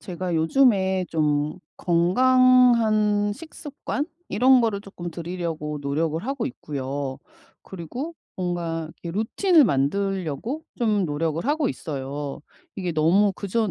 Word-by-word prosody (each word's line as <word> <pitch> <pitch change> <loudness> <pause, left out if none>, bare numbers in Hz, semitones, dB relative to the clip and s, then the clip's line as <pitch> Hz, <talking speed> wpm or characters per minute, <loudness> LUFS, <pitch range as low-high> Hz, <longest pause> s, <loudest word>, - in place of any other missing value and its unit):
제가 180 -1 -4
요즘에 190 +1 +3
좀 150 -1 0 0.2
건강한 215 +2 +4
식습관 295 +1 -5 0.2
이런 255 +2 +5
거를 220 -4 0
쪼끔 175 -4 -8
들이려고 165 -3 -4
노력을 155 +3 -1
하고 265 -2 -2
있고요. 140 - -5 0.4
그리고 240 - -7 0.2
뭔가 170 -3 -3
이 170 - -4
루틴을 295 - +3
만들려고 195 - -1 0.2
좀 215 -4 +2
노력을 160 +1 -2
하고 295 -1 +1
있어요. 140 -2 -5 0.4
이게 180 -3 -2
너무 175 +6 +3
그전 205 +3 -1
185 Hz, 255 characters per minute, -24 LUFS, 160-230 Hz, 0.4 s, 이런